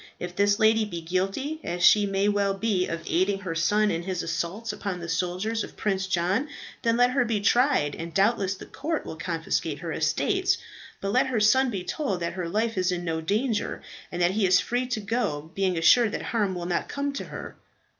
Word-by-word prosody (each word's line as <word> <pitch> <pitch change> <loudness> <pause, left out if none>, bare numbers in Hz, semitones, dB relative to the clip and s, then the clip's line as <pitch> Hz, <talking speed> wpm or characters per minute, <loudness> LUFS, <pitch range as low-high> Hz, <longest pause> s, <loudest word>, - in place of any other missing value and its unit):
If 175 0 -6
this 205 +1 +3
lady 220 0 +4
be 175 -5 -5
guilty, 195 - -2
as 175 +1 -3
she 205 +2 +6 0.2
well 200 -1 +2
may - - -14
be, 195 -4 +1
of 165 0 -4
aiding 195 +3 +1
her 185 -4 -3
son 205 +6 +2
in 165 - -1
his 185 0 -3
assaults 195 +7 -3
upon 195 -3 -4
the 170 - -6
soldiers 185 +6 -1
of - - -10
Prince 195 -2 -1
John, 190 - 0 0.3
then 230 0 +2
let 245 0 +4
her 255 -1 +2
be 225 -3 0
tried, 225 - +3
and 165 +3 -6
doubtless 195 0 +2
the - - -10
court 315 +2 -3
will - - -6
confiscate 165 -2 -2
her 165 +1 -5
estates. 375 - +1 0.4
But 195 - -1
let 255 +5 +3
her 250 -4 0
son 260 +5 +4
be 195 -6 -3
told 195 - -2
that 170 - -2
her 180 -3 -4
life 220 +2 0
is 185 0 +1
in 175 -1 -3
no 160 -1 -1
danger, 215 +6 -1 0.3
and 175 - -4
that 175 - +4
he 200 0 +2
is 180 0 +5
free 245 +1 -1
to 245 -3 -2
go, 200 -8 -2
being 190 -2 0
assured 215 +7 +5
that - - -3
harm 205 -5 0
will 175 -1 -4
not 175 0 -1
come 280 0 -2
to 275 - -5
her." - - -8
195 Hz, 215 wpm, -26 LUFS, 175-225 Hz, 0.4 s, she